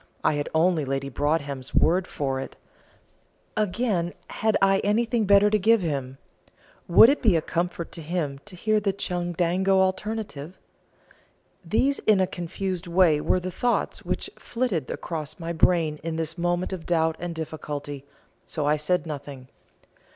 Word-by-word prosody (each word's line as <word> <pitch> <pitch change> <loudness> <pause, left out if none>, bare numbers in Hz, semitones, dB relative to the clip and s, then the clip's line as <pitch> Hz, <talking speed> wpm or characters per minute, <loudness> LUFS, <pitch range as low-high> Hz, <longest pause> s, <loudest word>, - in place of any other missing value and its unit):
I - - +3
had 145 0 -2
only 165 -1 +3
Lady 135 0 -2
Broadhem's 140 -1 -2
word 180 +3 +3
for 135 -4 -2
it. 135 - -7 1.0
Again, 200 -4 0
had 220 0 +1
I 195 0 +4
anything 225 +2 +1
better 200 +1 +5
to 215 - +3
give 225 +2 +4
him? 135 -5 -3 0.7
would 180 +6 +8
it 280 +4 +2
be 210 -7 +4
a 165 - +2
comfort 170 0 -3
to 165 - -7
him 150 -4 -3
to 205 - -9
hear 215 +4 +1
the 200 -2 0
Chundango 180 +1 0
alternative? 190 -4 -2 1.1
These 255 +11 +1
in 210 -3 +3
a 185 - +4
confused 180 +1 -4
way 170 -4 +4
were 185 - +2
the 185 +1 -5
thoughts 245 +7 -1
which - - -3
flitted 230 - -2
across 155 -2 -5
my 170 0 -4
brain 160 -2 +2
in 165 0 -3
this 165 0 -3
moment 175 +2 -1
of 175 -4 -7
doubt 160 -2 +2
and 175 -1 -5
difficulty, 145 -3 -5 0.4
so 150 - -3
I 150 +1 +3
said 180 +5 0
nothing. 140 -4 -7
175 Hz, 155 wpm, -25 LUFS, 150-195 Hz, 1.1 s, would